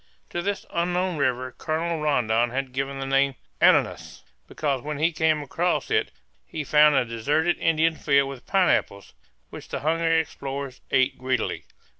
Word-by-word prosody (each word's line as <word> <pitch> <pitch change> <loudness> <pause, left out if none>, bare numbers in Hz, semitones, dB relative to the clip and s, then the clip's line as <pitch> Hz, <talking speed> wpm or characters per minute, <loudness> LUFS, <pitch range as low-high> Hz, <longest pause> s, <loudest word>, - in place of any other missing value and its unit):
To 175 - -2
this 200 +3 -3
unknown 180 0 -1
river 130 -2 0
Colonel 160 +1 -2
Rondon 120 -5 +1
had 135 +1 -3
given 135 +1 -3
the 135 - -3
name 135 0 +2 0.3
Ananas, - - +2 0.2
because 140 -4 -2
when 150 +1 -5
he 160 +4 +2
came 155 -1 +1
across 175 +5 -1
it - - +1 0.3
he 150 - -6
found 150 +1 +5
a 130 -2 +3
deserted 145 +9 0
Indian 165 0 +2
field 140 -2 +2
with 135 -2 -9
pineapples, 175 - +1 0.4
which - - -10
the - - -4
hungry 165 +1 +2
explorers 140 -4 -5
ate 130 -1 +2
greedily. 130 -2 -2
145 Hz, 155 wpm, -25 LUFS, 130-160 Hz, 0.4 s, found